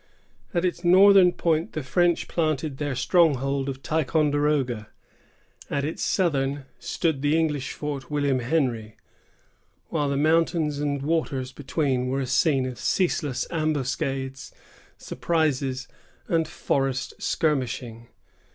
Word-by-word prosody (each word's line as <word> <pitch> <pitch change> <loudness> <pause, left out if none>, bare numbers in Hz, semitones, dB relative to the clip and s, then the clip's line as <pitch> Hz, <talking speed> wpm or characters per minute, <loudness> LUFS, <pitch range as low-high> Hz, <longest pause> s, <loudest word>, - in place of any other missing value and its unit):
At 175 -1 0
its 175 -1 -2
northern 190 +1 +7
point 165 -2 0
the 155 - -3
French 175 +6 +1
planted 155 -3 -1
their 145 -3 -2
stronghold 140 -2 +2
of 135 0 -7
Ticonderoga; 145 -6 0 0.8
at 140 -1 -1
its 155 - -4
southern 140 -6 0
stood 160 -6 -1
the 145 +2 +2
English 150 -5 -1
fort 145 -3 -5
William 145 -3 +1
Henry, 120 -5 -1 0.9
while 150 -3 0
the 140 - 0
mountains 155 -1 +2
and 140 -1 -1
waters 140 -5 -1
between 130 -2 -1
were 135 +2 -1
a - - -1
scene 130 +1 +2
of 130 -2 -6
ceaseless 155 -7 0
ambuscades, 135 -4 -2 0.5
surprises, 135 -5 -1 0.4
and 165 -1 +1
forest 135 -1 -1
skirmishing. 125 -6 -1
145 Hz, 115 wpm, -25 LUFS, 130-160 Hz, 0.9 s, northern